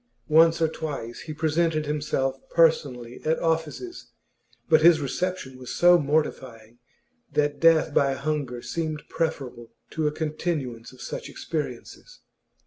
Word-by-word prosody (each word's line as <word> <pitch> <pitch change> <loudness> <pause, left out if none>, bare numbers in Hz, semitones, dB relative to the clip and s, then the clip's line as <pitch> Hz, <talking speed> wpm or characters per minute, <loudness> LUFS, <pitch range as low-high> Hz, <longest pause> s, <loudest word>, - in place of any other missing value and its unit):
Once 165 +2 +5
or 165 - +3
twice 145 -7 -5
he 160 - -8
presented 155 0 0
himself 145 -3 -1
personally 135 -7 +1
at 160 +1 +1
offices, 165 - -2 0.6
but 160 -2 +5
his 165 0 +7
reception 140 -2 -3
was 125 -1 -9
so 175 0 +6
mortifying 130 -6 -2 0.5
that 145 -1 +1
death 160 -1 +4
by 140 -1 +3
hunger 140 -3 -3
seemed 155 -2 -3
preferable 135 -8 -3 0.2
to 155 -1 0
a - - +1
continuance 150 -6 -3
of 130 - -15
such - - -6
experiences. - - -6
150 Hz, 130 wpm, -25 LUFS, 135-160 Hz, 0.6 s, his